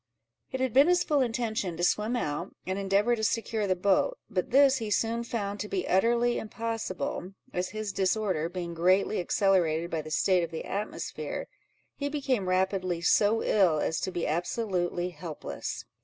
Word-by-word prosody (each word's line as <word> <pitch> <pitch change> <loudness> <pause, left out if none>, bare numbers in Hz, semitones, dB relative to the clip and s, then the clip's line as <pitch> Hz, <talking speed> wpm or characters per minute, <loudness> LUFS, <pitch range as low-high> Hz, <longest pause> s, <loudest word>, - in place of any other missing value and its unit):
It 260 - -3
had 260 -4 0
been 275 +4 +6
his 360 0 +4
full 295 -3 +2
intention 225 -7 -1
to 175 - -3
swim 210 +6 +1
out, 170 -4 -3
and 190 +1 -2
endeavour 200 +4 +2
to 220 - -5
secure 220 -1 0
the 185 - +2
boat; 200 - +2
but 185 -3 -1
this 275 +1 +5
he 225 -3 -4
soon 230 +3 0
found 205 -4 -3
to 210 - -3
be 185 -2 -2
utterly 235 +5 +2
impossible, 215 -4 -4 0.2
as 180 0 -1
his 215 -2 -4
disorder 190 -4 0
being 175 -1 -5
greatly 185 +5 +2
accelerated 175 -3 +2
by 160 - -1
the 155 - -9
state 180 +3 +3
of 170 - -3
the 160 - -6
atmosphere, 205 +2 -4 0.5
he 285 -1 -2
became 265 -10 -1
rapidly 185 -1 +1
so 210 +6 +3
ill, 185 -7 +3
as 160 +1 0
to 185 - -2
be 175 -2 -2
absolutely 175 +1 -1
helpless. 170 -3 -6
195 Hz, 170 wpm, -28 LUFS, 180-230 Hz, 0.5 s, been